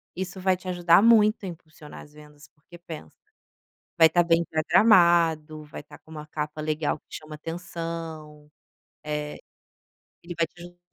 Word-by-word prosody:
Isso 185 Hz, +1 st, -6 dB
vai 185 Hz, 0 st, +2 dB
te 185 Hz, -, -13 dB
ajudar 175 Hz, 0 st, +4 dB
muito 215 Hz, -2 st, +4 dB
a -, -, -4 dB
impulsionar 155 Hz, -3 st, -11 dB
as 150 Hz, -, -18 dB
vendas, 150 Hz, -1 st, -16 dB
porque 165 Hz, +4 st, -17 dB
pensa: 165 Hz, -2 st, -11 dB, 0.8 s
vai 165 Hz, -1 st, +8 dB
estar 175 Hz, +2 st, +2 dB
bem 170 Hz, 0 st, +2 dB
programado, 165 Hz, -3 st, +3 dB
vai 150 Hz, -, -9 dB
estar 145 Hz, -, -15 dB
com 160 Hz, -, -20 dB
uma 150 Hz, -1 st, -9 dB
capa 150 Hz, 0 st, -5 dB
legal 155 Hz, 0 st, -2 dB
que -, -, -62 dB
chama 155 Hz, 0 st, -9 dB
atenção, 165 Hz, -2 st, -7 dB, 0.5 s
eh, 150 Hz, -1 st, -4 dB, 0.9 s
ele 175 Hz, +1 st, -8 dB
vai 165 Hz, 0 st, +1 dB
te 175 Hz, -, -21 dB
ajudar 175 Hz, 0 st, -12 dB
165 Hz, 160 wpm, -25 LUFS, 150-175 Hz, 0.9 s, vai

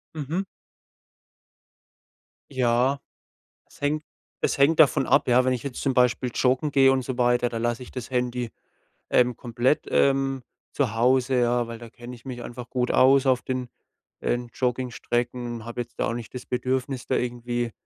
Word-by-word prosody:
Mhm. 155 Hz, +6 st, -2 dB, 2.1 s
Ja. 130 Hz, +1 st, +2 dB, 0.7 s
Es -, -, -20 dB
hängt 150 Hz, +2 st, 0 dB, 0.4 s
es -, -, +1 dB
hängt 145 Hz, +3 st, +4 dB
davon 135 Hz, -3 st, +5 dB
ab, -, -, +3 dB
ja, 125 Hz, +1 st, +5 dB
wenn 130 Hz, 0 st, +2 dB
ich 120 Hz, -, -5 dB
jetzt 140 Hz, -3 st, -5 dB
zum 135 Hz, -2 st, 0 dB
Beispiel 125 Hz, 0 st, +2 dB
joggen 130 Hz, +3 st, +2 dB
gehe 135 Hz, -1 st, +5 dB
und 130 Hz, -1 st, +1 dB
so 130 Hz, 0 st, -4 dB
weiter, 120 Hz, 0 st, +3 dB
da 120 Hz, -, -6 dB
lasse 120 Hz, +1 st, -1 dB
ich 125 Hz, -, -11 dB
das 125 Hz, -2 st, -7 dB
Handy, 125 Hz, -1 st, -1 dB, 0.6 s
ähm, 125 Hz, -1 st, +3 dB
komplett, 120 Hz, +4 st, 0 dB
ähm, 135 Hz, -1 st, +2 dB, 0.3 s
zu 130 Hz, -6 st, 0 dB
Hause, 125 Hz, +2 st, +3 dB
ja, 120 Hz, 0 st, +1 dB
weil 115 Hz, -1 st, -7 dB
da 115 Hz, -1 st, -10 dB
kenne 120 Hz, +2 st, -10 dB
ich 120 Hz, -, -18 dB
mich 125 Hz, -2 st, -6 dB
einfach 120 Hz, -1 st, -8 dB
gut 125 Hz, -1 st, 0 dB
aus 135 Hz, +1 st, +5 dB
auf 130 Hz, -2 st, +3 dB
den, 130 Hz, -1 st, -3 dB, 0.5 s
ähm, 120 Hz, 0 st, -1 dB
Joggingstrecken. 120 Hz, -1 st, -2 dB
Habe 120 Hz, +1 st, -4 dB
jetzt 120 Hz, -, -11 dB
da -, -, +1 dB
auch -, -, -2 dB
nicht 120 Hz, 0 st, -7 dB
das 125 Hz, -, -6 dB
Bedürfnis, 130 Hz, 0 st, -2 dB
da -, -, +1 dB
irgendwie 120 Hz, -1 st, -2 dB
125 Hz, 170 wpm, -25 LUFS, 120-130 Hz, 2.1 s, davon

